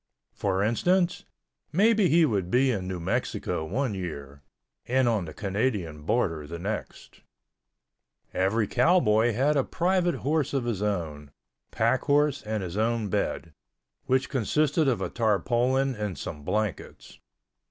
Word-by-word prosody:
For 95 Hz, -1 st, 0 dB
instance, 175 Hz, -, +1 dB, 0.5 s
maybe 205 Hz, +2 st, +4 dB
he 165 Hz, +1 st, +5 dB
would 100 Hz, -, -1 dB
be 130 Hz, +5 st, +3 dB
in 95 Hz, -5 st, -3 dB
New 95 Hz, -1 st, -4 dB
Mexico 85 Hz, -1 st, -2 dB
one 115 Hz, -, -2 dB
year 70 Hz, -7 st, -6 dB, 0.5 s
and 130 Hz, 0 st, +2 dB
on 110 Hz, -6 st, +1 dB
the 80 Hz, -, -8 dB
Canadian 100 Hz, -7 st, -2 dB
border 80 Hz, -4 st, -1 dB
the 85 Hz, +2 st, -6 dB
next. 100 Hz, +5 st, -6 dB, 1.1 s
Every 100 Hz, +4 st, +1 dB
cowboy 120 Hz, -, +3 dB
had 140 Hz, +7 st, +2 dB
a 140 Hz, -, +3 dB
private 180 Hz, +1 st, +1 dB
horse 150 Hz, -1 st, 0 dB
of 130 Hz, -3 st, 0 dB
his 115 Hz, -5 st, -2 dB
own, 80 Hz, -8 st, -3 dB, 0.4 s
pack 115 Hz, +3 st, +1 dB
horse 145 Hz, 0 st, +2 dB
and 110 Hz, -2 st, -3 dB
his 90 Hz, +1 st, -5 dB
own 110 Hz, -1 st, 0 dB
bed, 90 Hz, -5 st, -2 dB, 0.5 s
which 130 Hz, 0 st, +2 dB
consisted 150 Hz, -, +1 dB
of 125 Hz, -4 st, +1 dB
a -, -, -2 dB
tarpaulin 120 Hz, +4 st, +1 dB
and 105 Hz, -5 st, -4 dB
some 75 Hz, -, -6 dB
blankets. 105 Hz, +2 st, -4 dB
110 Hz, 140 wpm, -27 LUFS, 95-135 Hz, 1.1 s, he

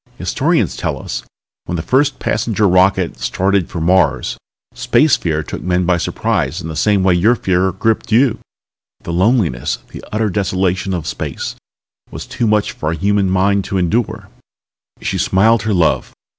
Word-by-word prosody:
Historians -, -, 0 dB
tell -, -, -3 dB
us -, -, -5 dB
that -, -, -27 dB, 0.4 s
when 90 Hz, -, -3 dB
the 80 Hz, -, -3 dB
first 135 Hz, -, +2 dB
passenger 105 Hz, -2 st, 0 dB
rocket 95 Hz, 0 st, +2 dB
started 95 Hz, -1 st, 0 dB
out -, -, -23 dB
for 85 Hz, -, -5 dB
Mars, 80 Hz, -7 st, +2 dB, 0.4 s
Space 150 Hz, -1 st, +3 dB
Fear 80 Hz, -2 st, -2 dB
took -, -, -7 dB
men 90 Hz, 0 st, 0 dB
by 90 Hz, 0 st, +2 dB
surprise 80 Hz, -1 st, -1 dB
in 80 Hz, -, -6 dB
the 80 Hz, -, -5 dB
same 100 Hz, +4 st, +2 dB
way 95 Hz, -1 st, +4 dB
your 105 Hz, +8 st, +3 dB
fear 95 Hz, -3 st, +1 dB
gripped 110 Hz, +5 st, -1 dB
you. 120 Hz, +1 st, +3 dB, 0.6 s
The 85 Hz, -, -4 dB
loneliness, 90 Hz, -, +1 dB
the -, -, -9 dB
utter 110 Hz, -1 st, 0 dB
desolation 95 Hz, -1 st, -1 dB
of 85 Hz, -4 st, -4 dB
space, -, -, -4 dB, 0.5 s
was -, -, -7 dB
too 125 Hz, -3 st, -2 dB
much 105 Hz, -1 st, +1 dB
for 75 Hz, -, -4 dB
a 85 Hz, -, -1 dB
human 100 Hz, +3 st, +1 dB
mind 100 Hz, +2 st, +2 dB
to 95 Hz, -, -2 dB
endure." 100 Hz, +6 st, -1 dB, 0.7 s
She -, -, -2 dB
smiled 110 Hz, +4 st, +3 dB
her 110 Hz, -2 st, -1 dB
love. 80 Hz, -8 st, +1 dB
95 Hz, 170 wpm, -17 LUFS, 85-105 Hz, 0.7 s, way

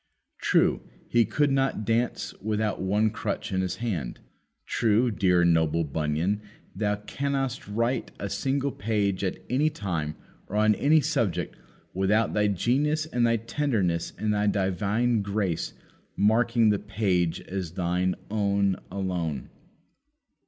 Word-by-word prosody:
"True, -, -, +3 dB, 0.3 s
he 120 Hz, -1 st, +3 dB
could 145 Hz, +7 st, +1 dB
not 135 Hz, -5 st, +1 dB
dance 115 Hz, +3 st, 0 dB
without 105 Hz, 0 st, -1 dB
one 105 Hz, +3 st, +2 dB
crutch -, -, -3 dB
in 95 Hz, -1 st, +1 dB
his 95 Hz, -, -2 dB
hand." 90 Hz, -, -3 dB, 0.5 s
True, 115 Hz, +2 st, +2 dB
dear 90 Hz, -4 st, +3 dB
and 85 Hz, -1 st, +5 dB
noble 80 Hz, 0 st, +2 dB
Bunyan, 80 Hz, +7 st, -1 dB, 0.3 s
thou 105 Hz, +1 st, 0 dB
canst 140 Hz, +7 st, -3 dB
not 135 Hz, -6 st, -3 dB
write 120 Hz, +2 st, 0 dB
a 100 Hz, -, -3 dB
single 135 Hz, +6 st, -1 dB
page 100 Hz, -3 st, -1 dB
at 95 Hz, -, -1 dB
any 145 Hz, +5 st, +2 dB
time 85 Hz, -, -3 dB, 0.3 s
or 100 Hz, -, -6 dB
on 105 Hz, 0 st, +4 dB
any 150 Hz, +8 st, +4 dB
subject 135 Hz, -, -1 dB, 0.4 s
without 100 Hz, +4 st, +2 dB
thy 105 Hz, 0 st, +2 dB
genius 140 Hz, -, +1 dB
and 125 Hz, -7 st, +1 dB
thy 115 Hz, 0 st, +3 dB
tenderness 110 Hz, -, -1 dB
and 105 Hz, -1 st, 0 dB
thy 105 Hz, 0 st, +1 dB
divine 105 Hz, +4 st, +1 dB
grace 100 Hz, -4 st, -2 dB, 0.4 s
marking 115 Hz, +2 st, +3 dB
the 100 Hz, -, +1 dB
page 90 Hz, -5 st, 0 dB
as 90 Hz, -4 st, -5 dB
thine 90 Hz, 0 st, 0 dB, 0.2 s
own 100 Hz, -2 st, +1 dB
alone! 90 Hz, -7 st, -3 dB
105 Hz, 140 wpm, -27 LUFS, 95-115 Hz, 0.5 s, and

